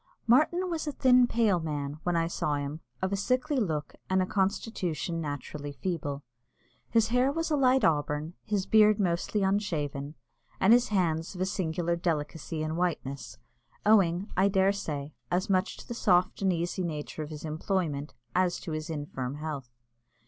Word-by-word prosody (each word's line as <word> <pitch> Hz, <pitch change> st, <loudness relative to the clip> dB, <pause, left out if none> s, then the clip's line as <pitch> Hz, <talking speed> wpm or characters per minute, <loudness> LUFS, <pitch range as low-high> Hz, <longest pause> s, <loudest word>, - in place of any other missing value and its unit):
Martin 310 Hz, +10 st, +4 dB
was 330 Hz, -3 st, -3 dB
a -, -, 0 dB
thin 250 Hz, -2 st, +5 dB
pale 220 Hz, -6 st, +2 dB
man, 150 Hz, -2 st, -4 dB
when 175 Hz, 0 st, 0 dB
I 165 Hz, 0 st, +2 dB
saw 155 Hz, -3 st, -1 dB
him, 145 Hz, +2 st, -4 dB, 0.2 s
of 190 Hz, +1 st, 0 dB
a -, -, +3 dB
sickly 255 Hz, +8 st, 0 dB
look, 155 Hz, -, -1 dB, 0.2 s
and 190 Hz, 0 st, +3 dB
a 185 Hz, -, +2 dB
constitution 185 Hz, -4 st, -1 dB
naturally 145 Hz, 0 st, -5 dB
feeble. 145 Hz, -4 st, -3 dB, 0.7 s
His 225 Hz, -1 st, +3 dB
hair 250 Hz, +3 st, +3 dB
was 330 Hz, +2 st, -2 dB
a -, -, +4 dB
light 265 Hz, -1 st, +4 dB
auburn, 150 Hz, +1 st, +1 dB
his 205 Hz, -3 st, -1 dB
beard 215 Hz, 0 st, +5 dB
mostly 185 Hz, +2 st, 0 dB
unshaven, 155 Hz, -8 st, -1 dB, 0.4 s
and 200 Hz, +4 st, +6 dB
his 245 Hz, 0 st, +5 dB
hands 170 Hz, -4 st, 0 dB
of 180 Hz, -, -5 dB
a -, -, +3 dB
singular 170 Hz, -3 st, -1 dB
delicacy 160 Hz, -1 st, -2 dB
and 155 Hz, +1 st, -2 dB
whiteness, 155 Hz, -6 st, -2 dB, 0.5 s
owing, 195 Hz, -3 st, +4 dB
I 190 Hz, +2 st, +4 dB
dare 195 Hz, 0 st, +3 dB
say, 150 Hz, -7 st, -4 dB, 0.2 s
as 185 Hz, +4 st, 0 dB
much 185 Hz, 0 st, +1 dB
to -, -, -11 dB
the 240 Hz, -, -4 dB
soft 185 Hz, -6 st, +2 dB
and 190 Hz, -1 st, +3 dB
easy 175 Hz, +2 st, -1 dB
nature 155 Hz, -2 st, -4 dB
of 150 Hz, -, -5 dB
his 155 Hz, 0 st, -7 dB
employment 155 Hz, -2 st, -2 dB, 0.2 s
as 180 Hz, -1 st, +2 dB
to 165 Hz, -, -6 dB
his 155 Hz, +1 st, -4 dB
infirm 145 Hz, -4 st, -4 dB
health. 150 Hz, -4 st, -5 dB
175 Hz, 170 wpm, -29 LUFS, 155-205 Hz, 0.7 s, and